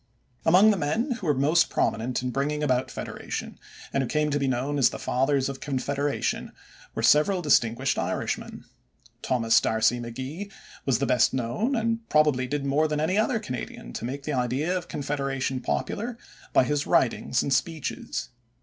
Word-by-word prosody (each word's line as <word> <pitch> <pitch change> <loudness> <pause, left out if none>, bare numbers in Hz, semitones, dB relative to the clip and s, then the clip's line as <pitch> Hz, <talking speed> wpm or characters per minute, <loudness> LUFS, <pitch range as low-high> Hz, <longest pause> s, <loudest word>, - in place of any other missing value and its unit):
Among 190 +6 +7
the 205 - 0
men 215 - -1
who 180 - -5
were 150 - +4
most 155 +5 +3
prominent 125 +3 0
in 125 - -1
bringing 150 +3 -1
about 130 -3 +1
federation - - -6 0.3
and 135 - +2
who 130 - -2
came 150 0 +1
to 145 - +1
be 140 - 0
known 135 +3 -1
as 135 - +5
the - - -6
Fathers 135 +1 +1
of 135 -1 -5
Confederation 140 +1 -2 0.4
were - - -2
several 175 +5 +4
distinguished 120 -6 +2
Irishmen. - - -3 0.6
Thomas 115 -2 +3
D'Arcy 110 +2 +2
McGee 130 - -6 0.4
was 130 -4 +3
the 140 - 0
best 125 0 +3
known 130 - -1
and 230 0 0
probably 150 -4 +3
did 145 +1 -2
more 145 +3 +2
than 150 -1 -1
any 180 +7 +1
other 225 +2 +2
Canadian 125 - -6
to - - -5
make 135 +4 -4
the 150 - -3
idea 130 +7 0
of 180 - -3
confederation 135 -2 -2
popular 230 - -2 0.3
by - - +5
his 145 +2 -1
writings - - +2
and 140 - 0
speeches. 155 +2 -2
140 Hz, 170 wpm, -26 LUFS, 130-155 Hz, 0.6 s, Among